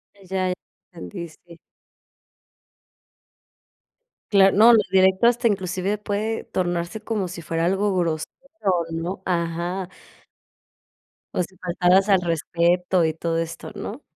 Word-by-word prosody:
Ya, 190 -1 -2 0.4
entendí, 175 0 -7
sí. 170 +2 -17 2.7
Claro, 195 -1 +5
no, 230 +3 +8
lo 225 - +6
directo, 190 +2 +4
hasta 240 0 +3
inclusive 190 0 -1
puede 210 +2 -2
tornarse 175 +2 -2
como 215 -4 -3
si 170 -1 -7
fuera 165 0 -2
algo 195 +3 +1
grosero 165 -3 -1 0.6
¿no? 170 +4 -4
Ajá. 175 +1 -2 1.5
O 180 - +1
si 185 +2 -12
faltaras 180 +2 +2
al 195 -2 +5
respeto 175 +2 +1
y 160 - 0
todo 165 +1 -2
esto, 165 +5 -5
¿no? 215 +6 -6
185 Hz, 115 wpm, -23 LUFS, 170-195 Hz, 2.7 s, no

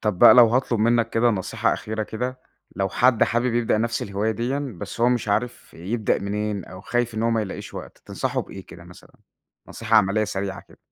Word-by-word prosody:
طب 105 -5 -1
بقى - - +9
لو 120 -2 +8
هاطلب 120 -1 0
منك 115 +1 +2
كده 120 +1 +3
نصيحة 95 -5 -1
أخيرة 110 0 -4
كده، 125 +4 -5 0.4
لو 95 0 0
حد 120 +1 +3
حابب 120 +1 0
يبدأ 115 -2 +1
نفس 115 +1 -1
الهواية 100 +2 -2
ديًا، 125 +2 -3
بس - - -7
هو 120 - +5
مش 120 -4 -1
عارف 115 +4 -2
يبدأ 105 +6 -1
منين 105 0 -3
أو 90 0 -11
خايف 120 +2 -1
إن 110 - -2
هو 115 - +2
ما 115 -1 +1
يلاقيش 95 - -7
وقت. - - -9
تنصحه - - -2
بإيه - - -11
كده - - -13
مثلًا؟ - - -16 0.5
نصيحة 115 0 0
عملية، 105 +1 +3
سريعة 95 -1 -4
كده. - - -19
110 Hz, 205 wpm, -23 LUFS, 105-120 Hz, 0.5 s, بقى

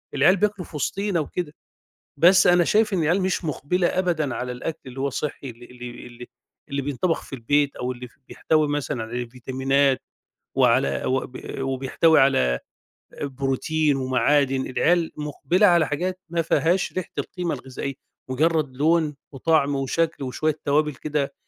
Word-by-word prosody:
العيال 155 +8 +5
بياكلوا 205 -2 0
في - - -13
وسطينا 195 +5 -1
وكده، 155 +1 -4 0.6
بس 180 +5 +6
أنا 175 0 +5
شايف 215 +4 +2
إن 185 - +1
العيال 175 +6 +2
مش 185 -1 -1
مُقبِلة 175 +4 0
أبدًا 165 -8 0
على 125 0 -3
الأكْل 125 +6 -5
اللي 130 0 -9
هو 140 +1 0
صحّي 140 0 -4
اللي 120 0 -12
اللي 125 0 -9 0.2
اللي 120 0 -11 0.4
اللي 140 -1 -2
بينطَبَخ 145 +5 -1
في - - -13
البيت 140 +4 +1
أو 125 +1 -3
اللي 125 0 -8 0.2
بيحتوي 155 -1 +1
مثلًا 145 -4 -2
على 120 +2 -4
فيتامينات 130 +2 +1 0.6
وعلى 70 0 +3
وب 130 -1 -2 0.2
وبيحتوي 135 +4 +2
على 65 - +3 0.6
بروتين 140 +2 0
ومعادن، 135 +1 +2
العيال 165 +5 +1
مُقبِلة 150 +6 +2
على 170 -4 +4
حاجات 180 +5 -2
ما 170 0 0
فيهاش 165 +3 +1
ريحة 185 -2 -4
القيمة 180 -2 -3
الغذائية، 135 +1 -6 0.4
مُجرّد 150 0 +1
لون 155 0 +2 0.2
وطعم 145 0 +1
وشكْل 145 +3 -1
وشوية 150 +4 -1
توابل 150 0 +2
كده 150 0 -2
145 Hz, 150 wpm, -24 LUFS, 130-165 Hz, 0.6 s, بس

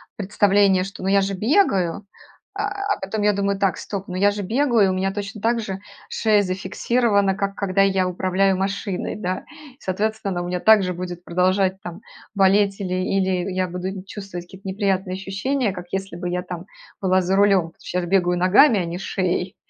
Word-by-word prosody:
представление, 200 -1 +3
что, 195 - -9
ну, 190 - 0
я 200 - +5
же 195 0 -1
бегаю, 200 - +1 0.5
а 410 +1 -1
а, 405 0 -2
потом 205 +2 -3
я 210 0 +4
думаю: 200 0 0
"Так, 195 -3 +1
стоп, 195 -2 -5
ну, 180 - -6
я 200 +2 +4
же 205 0 -3
бегаю, 230 -2 +2
у 185 - -1
меня 190 +1 0
точно 205 +1 -6
так 230 +1 +1
же 195 -3 -4 0.3
шея 210 -2 +2
зафиксирована, 200 +2 +1
как 200 0 -2
когда 195 -1 +1
я 190 -1 +2
управляю 190 +1 +1
машиной, 195 0 -3
да". 185 -3 -3 0.4
Соответственно, 195 -1 -2
у 175 - -5
меня 180 0 -2
так 220 -1 +6
же 180 - -2
будет 180 0 -6
продолжать 185 +2 +1
там 175 +2 -8 0.3
болеть 195 0 +3
или 185 -2 -3
или 185 0 0
я 185 0 0
буду 180 +1 -4
нь 190 -1 -7
чувствовать 195 -4 -8
какие-то 190 +2 -12
неприятные 190 -1 -1
ощущения, 205 +5 -1
как 180 -2 -8
если 195 -1 -4
бы 175 +1 -4
я 180 0 -2
там 180 0 -7 0.4
была 185 -1 +3
за 185 +2 0
рулем, 195 -5 +3
а - - -41
щас 180 -1 -3
бегаю 180 -1 +2
ногами, 205 +6 +5
а 175 - -1
не 170 +2 -5
шеей. 185 -1 -2
195 Hz, 190 wpm, -22 LUFS, 185-205 Hz, 0.5 s, так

